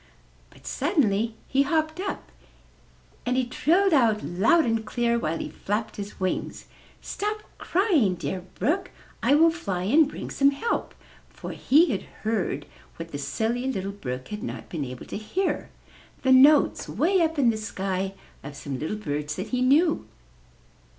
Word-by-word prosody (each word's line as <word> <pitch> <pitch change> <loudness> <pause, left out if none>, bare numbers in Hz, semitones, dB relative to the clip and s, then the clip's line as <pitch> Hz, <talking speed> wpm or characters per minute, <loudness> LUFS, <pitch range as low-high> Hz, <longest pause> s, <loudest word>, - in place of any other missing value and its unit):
But - - -20
suddenly 225 - +1
he 270 - +2
hopped 315 +3 0
up, 390 - -5 0.9
and 250 +1 0
he 260 - +2
trilled 345 +9 +2
out 230 -7 +3
loud 195 - +3
and 225 -1 0
clear, 235 +1 0
while 160 -4 -1
he - - -5
flapped 210 +2 -3
his 205 0 -7
wings, 185 -1 -2 0.4
''Stop 425 +1 -3 0.2
crying, 330 - +2
dear 185 +1 -4
Brook; 355 - 0 0.3
I 285 - +4
will 325 +2 +6
fly 200 - -3
and 285 - +4
bring - - -7
some 275 0 +4
help,*' 285 +12 -2 0.3
for - - -8
he 310 +4 +4
had 200 - -1 0.2
heard 200 -10 -1 0.3
what 165 0 -8
the 145 - -5
Silly 235 - -1
Little 195 -4 -3
Brook 130 -10 -6
had 210 0 -5
not - - -6
been 155 -5 -3
able 125 -1 -8
to - - -5
hear 360 - -2 0.3
— - - -26
the 260 - +3
notes 280 +3 +6
way 370 +2 +2
up 325 -1 +1
in 250 -5 +4
the - - -3
sky 195 -2 -3 0.3
of 145 +1 -8
some 140 -2 -5
little 160 +8 -3
birds 150 -5 -3
that 190 +3 -5
he 250 -1 -1
knew. 305 +6 +3
230 Hz, 165 wpm, -26 LUFS, 190-305 Hz, 0.9 s, will